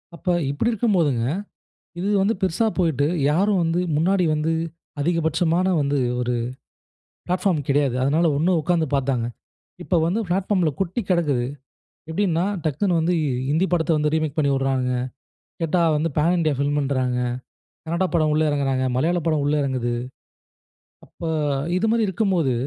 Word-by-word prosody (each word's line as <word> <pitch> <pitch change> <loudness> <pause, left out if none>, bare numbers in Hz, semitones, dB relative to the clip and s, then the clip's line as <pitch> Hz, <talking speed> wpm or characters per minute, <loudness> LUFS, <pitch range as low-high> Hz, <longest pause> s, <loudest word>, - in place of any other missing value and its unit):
அப்ப 175 - -18 0.2
இப்டி 230 +12 0
இருக்கும்போதுங்க, 170 - +1 0.8
இது 195 - -1
வந்து 215 +3 +2
பெருசா 190 +4 +1
போயிட்டு 155 -6 +2 0.2
யாரும் 190 +3 +2
வந்து 165 +2 +1 0.2
முன்னாடி 180 +3 +2
வந்து 155 +2 0 0.5
அதிகபட்சமான 165 +3 +1
வந்து 140 0 0 0.2
ஒரு 125 0 -1 0.9
பிளாட்ஃபார்ம் 180 -5 0
கிடையாது. 140 -3 +2
அதுனால 150 +6 +2
ஒண்ணு 170 +5 +2
உட்காந்து 165 -1 +1
பாத்தாங்க. 130 -3 0 0.6
இப்போ 180 - 0
வந்து 200 +6 0
பிளாட்ஃபார்ம்ல 180 -2 +1
கொட்டி 190 +5 -1
கிடக்கு. 165 -7 +2 0.7
எப்டின்னா, 175 -1 +1 0.2
டக்குனு 165 +4 +1
வந்து 170 +3 +1 0.4
ஹிந்தி 160 +6 +2
படத்த 170 0 +1
வந்து 150 0 +1
ரீமேக் 155 -2 -1
பண்ணி 145 -2 +2
விடுறாங்குங்க. 130 -2 0 0.7
கேட்டா 170 +2 +1
வந்து 160 +2 0
பேன் 165 +4 +3
இண்டியா 155 -3 +1
ஃபிலிம் 145 +1 0
இன்றாங்க. 130 -3 0 0.7
கனடா 170 +3 0
படம் 155 -3 +2
உள்ள 155 +1 +2
இறங்குறாங்க, 135 -2 0
மலையாள 170 +7 +1
படம் 155 -3 +1
உள்ள 150 +1 +2
இறங்குது. 130 -3 -1 1.1
அப்ப - - -10 0.5
இது 225 +4 +1
மாரி 230 -1 +2
இருக்கும்போது, 180 - +1
160 Hz, 140 wpm, -22 LUFS, 140-180 Hz, 1.1 s, பேன்